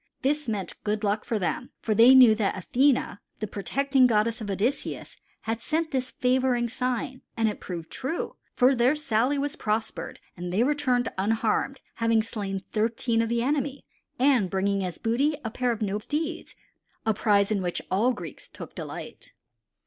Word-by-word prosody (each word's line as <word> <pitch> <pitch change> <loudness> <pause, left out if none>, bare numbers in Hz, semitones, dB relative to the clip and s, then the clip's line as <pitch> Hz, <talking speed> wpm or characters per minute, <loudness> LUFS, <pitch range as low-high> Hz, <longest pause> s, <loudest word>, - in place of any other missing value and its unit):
This 295 -1 0
meant 205 -4 -3
good 210 0 -1
luck 210 +1 0
for 225 - -1
them, 185 +6 -2
for 220 - 0
they 235 +5 +8
knew 250 -4 +9
that 215 -3 0
Athene, 250 +2 +1 0.2
the 215 - -3
protecting 265 +6 +2
goddess 225 0 +1
of 210 - -5
Odysseus, 210 +8 -2 0.3
had 225 +1 -3
sent 320 +4 -1
this 260 -2 -1
favoring 250 -1 +1
sign, 250 +1 -3 0.2
and 225 -1 +2
it 210 - -3
proved 170 -3 -7
true, 295 +7 -3 0.2
for 255 +1 +5
their 250 +3 +3
sally 260 -1 +1
was 285 +3 -2
prospered 220 -6 -3 0.2
and 175 0 -5
they 205 +6 +2
returned 255 -3 +1
unharmed, 225 +6 0 0.2
having 230 -1 +2
slain 200 -4 -4
thirteen 225 +1 +1
of 230 - -1
the 235 0 +1
enemy, 280 0 -1 0.3
and 250 -7 +3
bringing 195 +1 0
as 180 -2 -4
booty 260 +7 +1
a - - -6
noble 245 -7 -6
pair 250 +1 0
of 225 -2 -2 0.2
steeds, 315 +6 -3 0.5
a 220 - +3
prize 205 -1 +2
in 205 -2 +1
which 175 -1 -2
all 215 +7 +3
Greeks - - -8
took - - -10
delight. - - -8
230 Hz, 170 wpm, -26 LUFS, 210-260 Hz, 0.5 s, knew